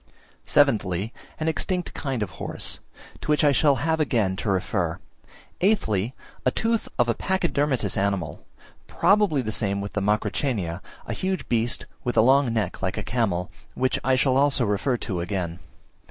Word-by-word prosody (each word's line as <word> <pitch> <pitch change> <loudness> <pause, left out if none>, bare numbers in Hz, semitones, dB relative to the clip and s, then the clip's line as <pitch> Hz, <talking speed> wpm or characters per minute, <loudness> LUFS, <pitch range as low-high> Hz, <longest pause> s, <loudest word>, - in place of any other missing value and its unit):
Seventhly, 110 -7 +2 0.3
an 155 - -1
extinct 180 +2 -1
kind 130 -6 -2
of 100 - -5
horse, - - -2 0.4
to - - -7
which 150 0 +3
I 145 - +6
shall 140 +1 +4
have 160 +3 0
again 110 -10 +1
to 105 - -2
refer. 95 -2 0 0.6
Eighthly, 125 - +1 0.3
a - - +4
tooth 225 - -1
of 120 - +3
a 120 - +2
Pachydermatous 145 - 0
animal, 95 -6 -1 0.4
probably 195 -8 +3
the 110 - -2
same 100 -2 0
with 100 0 -5
the 105 - -1
Macrauchenia, 105 - 0 0.2
a - - -3
huge 190 -1 -2
beast 120 0 0 0.2
with 120 - -2
a - - +8
long 130 +1 +4
neck 105 -6 -2
like 95 -1 -2
a - - -2
camel, 95 -8 -1 0.2
which 130 0 +1
I 130 0 +3
shall 130 0 +3
also 140 -3 +3
refer 105 +5 +1
to 95 -7 -3
again. 85 -2 -3
120 Hz, 165 wpm, -25 LUFS, 100-145 Hz, 0.6 s, a